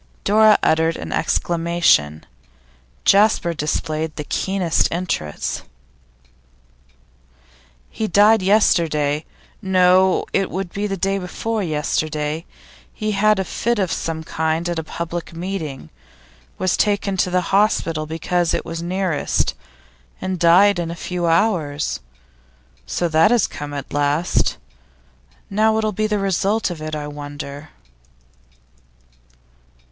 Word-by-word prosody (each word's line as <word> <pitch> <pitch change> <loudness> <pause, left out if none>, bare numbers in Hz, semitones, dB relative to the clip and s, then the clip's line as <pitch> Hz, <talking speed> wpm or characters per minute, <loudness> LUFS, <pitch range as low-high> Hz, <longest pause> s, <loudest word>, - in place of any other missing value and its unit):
Dora 215 +1 +5
uttered 160 +1 +2
an - - -7
exclamation; 170 - +1 0.8
Jasper 200 -4 +4
displayed 155 0 -2
the 150 - -4
keenest 185 +1 0
interest. 165 - -3 2.3
'He 220 - -2
died 210 +3 +5
yesterday 160 -7 +2 0.4
no, 185 -1 +3
it 195 -1 +1
would 185 -1 -4
be 205 +1 -2
the 195 -1 -3
day 195 +2 0
before 215 +4 -3
yesterday. 155 -1 -2 0.5
He 215 0 -3
had 210 +1 +3
a 190 - 0
fit 235 +6 -1
of 190 -4 0
some 160 -1 -3
kind 160 +1 -1
at 170 -1 -2
a - - -4
public 170 +1 -6
meeting, 165 - -5 0.7
was 185 -1 +1
taken 200 -2 0
to 180 - +1
the 180 +1 -1
hospital 165 -6 +2
because 165 +2 0
it - - -3
was 165 0 -5
nearest, 180 -2 -1 0.7
and 185 -1 -3
died 180 +3 +5
in 170 -1 -2
a 170 - -5
few 175 0 -3
hours. 165 -5 +1 0.9
So 175 - -1
that 160 +5 +4
has 235 -3 +3
come, 145 0 -7
at 140 -1 -6
last! 145 +4 +1 0.9
Now 215 +2 +2
what'll 215 -1 0
be 215 +2 -1
the 210 -1 0
result 195 +1 0
of 165 -3 -7
it, 155 0 -4
I 150 -1 -4
wonder? 145 0 -8
175 Hz, 120 wpm, -20 LUFS, 155-195 Hz, 2.3 s, Dora